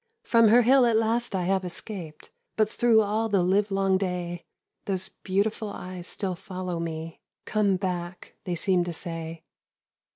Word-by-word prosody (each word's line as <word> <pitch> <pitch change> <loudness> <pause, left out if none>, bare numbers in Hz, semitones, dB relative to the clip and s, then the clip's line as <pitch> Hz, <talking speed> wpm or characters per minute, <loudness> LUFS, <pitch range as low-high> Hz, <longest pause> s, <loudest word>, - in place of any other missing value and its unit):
"From 230 -1 +5
her 240 +3 +6
hill 255 +1 +5
at 230 - +2
last 225 0 +1
I 185 - 0
have 190 +1 +1
escaped, 175 -3 -7 0.2
But 215 0 +2
through 230 -2 +4
all 215 +2 0
the 195 -4 +3
livelong 195 0 +2
day, 175 -2 -3 0.4
Those 190 -2 -2
beautiful 205 +3 -1
eyes 185 -2 -7
still 195 -3 -3
follow 180 0 -5
me. 165 -1 -5 0.3
'Come 210 -3 +2
back!' 180 -1 -4
they 180 -2 -2
seem 180 +1 +2
to 175 - -4
say. 165 -1 -6
190 Hz, 155 wpm, -26 LUFS, 175-215 Hz, 0.4 s, her